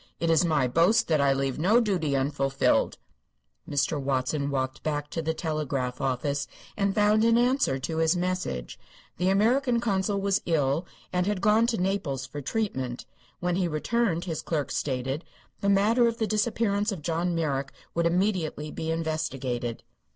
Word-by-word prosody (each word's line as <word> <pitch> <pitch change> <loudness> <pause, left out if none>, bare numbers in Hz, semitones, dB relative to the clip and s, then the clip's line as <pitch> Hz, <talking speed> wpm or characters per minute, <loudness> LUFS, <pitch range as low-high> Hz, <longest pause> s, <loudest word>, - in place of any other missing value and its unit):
It 165 0 +1
is 165 +2 +4
my 155 -6 +2
boast 170 - +3
that 155 -3 +3
I 140 -1 +4
leave 135 0 -1
no 205 +9 +4
duty 180 - 0
unfulfilled." 135 0 +1 0.7
Mr. 145 +1 0
Watson 135 +2 -1
walked 130 -1 -2
back 150 -1 -3
to 165 - -2
the 160 0 -2
telegraph 140 -6 -2
office 140 +2 -1 0.3
and 200 -1 0
found 210 +1 +4
an 230 0 +4
answer 245 - +2
to 160 +5 -4
his 160 +2 +3
message. 175 - -3 0.4
The 180 +2 +1
American 235 +5 +3
consul 200 -3 0
was 195 0 +1
ill 155 0 +1 0.3
and 180 +1 +1
had 205 -2 0
gone 215 +4 +4
to 235 -2 0
Naples 180 -9 -1
for 145 +1 -7
treatment. 130 - -3 0.4
When 180 0 0
he 185 -2 +1
returned, 175 +2 0
his 165 -4 -3
clerk 150 -4 -2
stated, 135 +3 -2 0.4
the 200 - 0
matter 220 +5 +4
of 230 0 -1
the 225 - 0
disappearance 215 -1 0
of 175 -7 -6
John 170 +2 0
Merrick 140 -4 -1 0.2
would 170 0 +2
immediately 170 -4 0
be 160 - -4
investigated. 135 -7 -2
165 Hz, 165 wpm, -27 LUFS, 140-200 Hz, 0.7 s, is